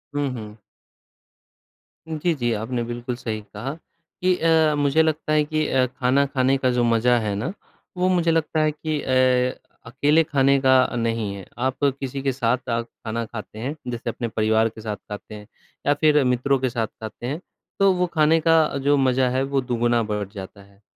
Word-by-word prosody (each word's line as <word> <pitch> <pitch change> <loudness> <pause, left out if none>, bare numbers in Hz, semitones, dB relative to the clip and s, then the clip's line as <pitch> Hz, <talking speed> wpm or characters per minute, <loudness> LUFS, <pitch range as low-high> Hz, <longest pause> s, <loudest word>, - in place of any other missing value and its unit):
हुँ, 145 -1 0
हुँ। 110 -2 -9 1.5
जी, 160 +2 0
जी 120 -3 -1
आपने 115 +3 -2
बिल्कुल 120 +1 -4
सही 110 -3 -4
कहा 135 +3 -4 0.5
कि 185 0 +4
अ, 160 -2 +3
मुझे 145 +1 +3
लगता 155 -1 -1
है 150 -1 +4
कि 155 0 -1
अ, 130 -1 +2
खाना 130 +2 +1
खाने 135 -1 +1
का 130 -1 +1
जो 125 -1 +1
मज़ा 120 +1 +3
है 105 -2 -2
ना, 125 - -3 0.4
वो 185 +1 +2
मुझे 170 -2 +2
लगता 160 -1 +1
है 155 0 +2
कि 155 0 -3
अ, 130 -1 +2 0.3
अकेले 145 +6 +2
खाने 140 -2 +3
का 130 -2 +4
नहीं 115 -3 -1
है। 95 - -9
आप 130 +3 -2 0.2
किसी 135 0 -4
के 135 -1 0
साथ-साथ 120 -2 -1
खाना 115 0 -5
खाते 110 -1 -9
हैं, 135 +6 -3
जैसे 120 -1 -4
अपने 120 +1 -3
परिवार 110 +1 +2
के 110 - -12
साथ 105 -1 -3
खाते 105 +1 -10
हैं, 105 0 -11 0.4
या 145 - +5
फ़िर 150 -1 +3
मित्रों 125 +2 +2
के 130 -1 0
साथ 115 -2 -2
खाते 110 +2 -7
हैं, 140 +6 -3 0.4
तो 195 0 +5
वो 180 0 +1
खाने 155 +1 +4
का 160 -3 +4
जो 145 0 +4
मज़ा 130 -1 +2
है 130 +2 0
वो 135 0 0
दुगुना 120 -1 +1
बढ़ 105 -2 -3
जाता 100 0 -9
है। 100 +1 -23
130 Hz, 190 wpm, -23 LUFS, 115-145 Hz, 1.5 s, या